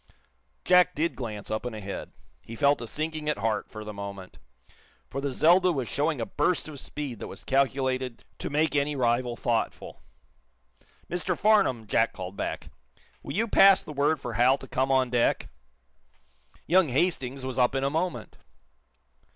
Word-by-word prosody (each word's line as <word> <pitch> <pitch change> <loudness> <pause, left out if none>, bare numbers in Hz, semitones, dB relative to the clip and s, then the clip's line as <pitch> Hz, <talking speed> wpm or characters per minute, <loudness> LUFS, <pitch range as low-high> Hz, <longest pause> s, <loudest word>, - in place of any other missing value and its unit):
Jack 180 0 +5
did 165 +3 0
glance 110 -5 -6
up 110 - -2
and 125 -2 -5
ahead. 100 -2 -6 0.3
He 115 - -10
felt 140 +3 +3
a 115 - -5
sinking 155 +3 -3
at 150 - 0
heart, 105 0 -1
for 110 -1 -8
the 105 0 -7
moment. 100 -2 -8 0.7
For 135 - -3
the 140 - -1
"Zelda" 180 +7 +4
was 135 -7 -2
showing 145 +2 -1
a 115 - -1
burst 150 +7 0
of 150 -3 -7
speed 135 -7 -5
that - - -6
was - - -9
calculated 130 -2 0 0.2
to - - -4
make 150 +1 +1
any 145 +1 +1
rival 120 -1 +1
thoughtful. 115 -1 -2 1.1
"Mr. 175 0 -2
Farnum," 195 - +3
Jack 115 +2 +1
called 95 +1 -7
back, - - -4 0.5
"will - - -6
you 225 +4 +1
pass 195 -2 +6
the 150 - -8
word 145 +2 +1
for 120 -3 -5
Hal 125 +4 +4
to 135 - -11
come 130 +1 0
on 130 -2 +2
deck?" 120 -1 +1 1.2
Young 180 0 +4
Hastings 135 -3 -1
was 130 -1 -3
up 125 +2 +3
in 135 - 0
a 140 - +1
moment! 170 +3 -3
135 Hz, 170 wpm, -27 LUFS, 120-155 Hz, 1.2 s, pass